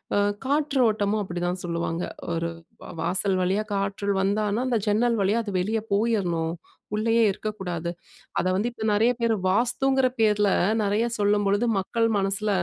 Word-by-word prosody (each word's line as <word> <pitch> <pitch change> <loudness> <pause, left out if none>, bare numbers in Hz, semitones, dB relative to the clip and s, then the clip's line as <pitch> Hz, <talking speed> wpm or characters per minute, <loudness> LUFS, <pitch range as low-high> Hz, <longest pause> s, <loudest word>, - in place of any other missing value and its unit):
அ - - +3 0.3
காற்றோட்டமும் 245 -8 +1
அப்படிதான் 175 0 -3
சொல்லுவாங்க. 170 0 -2 0.3
ஒரு 165 0 -1 0.3
வ - - -10
வாசல் 190 +1 0
வழியா 190 +4 +1
காற்றில் 200 0 -1
வந்தானா, 205 +2 0
அந்த 240 -3 +1
ஜன்னல் 230 +3 +2
வழியா 200 +4 +2
அது 205 -3 -5
வெளிய 215 +4 0
போயிறணும். 190 -7 0 0.4
உள்ளேயே 225 +2 +2
இருக்கக்கூடாது. 185 -5 -4 0.5
அத - - -1
வந்து 210 +5 0
இப்ப 220 -2 -5
நிறைய 225 +4 +4
பேரு 230 -1 +2
வாஸ்துங்குற 255 +5 +2
பேர்ல, 210 -2 +3 0.3
நிறைய 205 +3 +1
சொல்லும்பொழுது 205 +1 +2
மக்கள் 230 +4 0
மனசுல 195 +2 -1
205 Hz, 140 wpm, -25 LUFS, 190-225 Hz, 0.5 s, நிறைய